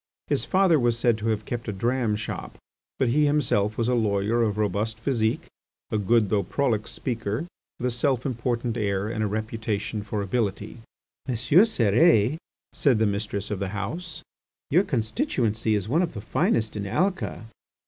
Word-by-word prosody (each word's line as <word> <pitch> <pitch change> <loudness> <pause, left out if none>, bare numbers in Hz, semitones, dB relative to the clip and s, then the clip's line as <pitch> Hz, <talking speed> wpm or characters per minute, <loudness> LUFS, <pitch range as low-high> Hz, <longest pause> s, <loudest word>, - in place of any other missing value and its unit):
His - - 0
father 185 -5 +4
was 120 -2 +2
said 115 0 +3
to 110 - -3
have 110 -1 -1
kept 120 -1 -4
a - - -1
dram 115 +2 0
shop, 105 - -6 0.4
but 130 - +2
he 150 +4 +3
himself 110 -8 +1
was 115 - 0
a 125 - +2
lawyer 110 0 +1
of 105 -3 0
robust 105 +2 -1
physique, 115 -3 0 0.5
a 110 - +1
good 105 0 +3
though 105 -2 +3
prolix 115 +1 -1
speaker, 115 +2 -3 0.3
with 125 - -4
a 125 - +1
self 125 +1 0
important 120 -2 -1
air 100 -2 0
and 110 -1 -2
a - - +1
reputation 110 0 -3
for 105 0 -3
ability. 105 +1 -2 0.5
"M. 130 - -1
Cérès," 125 - +4 0.4
said 135 -6 +3
the 110 - +2
mistress 100 0 -2
of 100 - -2
the 100 - -2
house, 165 - -5 0.5
"your 175 +7 +5
constituency 115 - 0
is 100 -2 -2
one 155 +9 +2
of 170 -8 -2
the 105 - -5
finest 110 +1 0
in 100 -1 -3
Alca." 185 - -1
115 Hz, 170 wpm, -25 LUFS, 105-125 Hz, 0.5 s, your